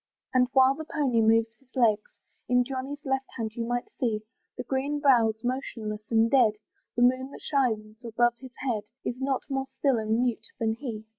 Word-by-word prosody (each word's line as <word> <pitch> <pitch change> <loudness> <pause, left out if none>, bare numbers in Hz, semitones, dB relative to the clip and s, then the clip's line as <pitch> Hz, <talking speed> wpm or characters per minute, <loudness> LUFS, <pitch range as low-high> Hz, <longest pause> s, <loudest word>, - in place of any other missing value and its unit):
And 250 -1 +4
while 265 0 +6
the 315 +3 -7
pony 275 -7 +1
moves 225 0 +3
his 265 -1 -31
legs, 220 -4 +2 0.4
In 250 0 +4
Johnny's 270 +3 -5
left 265 0 0
hand 220 -2 -3
you 230 -1 -3
may 245 0 0 0.2
see, 220 -4 0 0.3
The - - -3
green 275 +2 -1
bough's 230 -6 +3
motionless 230 -4 -3
and 225 0 +4
dead; 245 -6 +5 0.4
The 240 - +3
moon 255 +2 +3
that - - -11
shines 225 -5 -1
above 240 +1 +2
his 260 -2 -12
head 225 -4 0 0.2
Is 245 +2 -3
not 265 -1 0
more 270 -1 -2
still 270 -5 +2
and 220 +2 +1
mute 245 -3 -1
than 225 -1 0
he. 225 -3 -6
245 Hz, 190 wpm, -27 LUFS, 225-265 Hz, 0.4 s, while